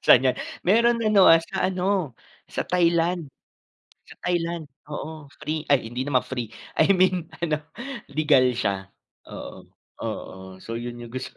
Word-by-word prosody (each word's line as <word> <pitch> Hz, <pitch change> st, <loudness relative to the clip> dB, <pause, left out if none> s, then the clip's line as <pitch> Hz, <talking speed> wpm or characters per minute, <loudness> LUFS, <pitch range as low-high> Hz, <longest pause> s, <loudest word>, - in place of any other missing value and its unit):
Saan 130 Hz, +1 st, +7 dB
'yan? 125 Hz, -, +1 dB, 0.3 s
Meron 235 Hz, +4 st, +4 dB
ano, 210 Hz, -3 st, +6 dB
ah, 165 Hz, 0 st, +8 dB
sa 190 Hz, +3 st, -1 dB
ano, 185 Hz, -5 st, 0 dB, 0.4 s
sa -, -, -3 dB
Thailand. 170 Hz, -2 st, +2 dB, 0.8 s
Sa -, -, -13 dB
Thailand, 170 Hz, -2 st, -1 dB, 0.2 s
oo, 150 Hz, 0 st, -7 dB
free 155 Hz, +1 st, -3 dB
ay 125 Hz, -5 st, +2 dB
hindi 125 Hz, -, -3 dB
naman 130 Hz, -3 st, +2 dB
free. 125 Hz, -4 st, -4 dB, 0.3 s
I 160 Hz, -, +5 dB
mean 180 Hz, -3 st, +2 dB, 0.2 s
ano, 155 Hz, -2 st, 0 dB, 0.5 s
legal 145 Hz, -3 st, +4 dB
siya, 100 Hz, -4 st, -1 dB, 0.4 s
oo, -, -, -9 dB, 0.3 s
oo. 95 Hz, 0 st, -6 dB
So 115 Hz, -, -4 dB
yun 120 Hz, 0 st, -5 dB
yung 115 Hz, -, -11 dB
gusto. 130 Hz, 0 st, -6 dB
155 Hz, 150 wpm, -25 LUFS, 130-180 Hz, 0.8 s, ah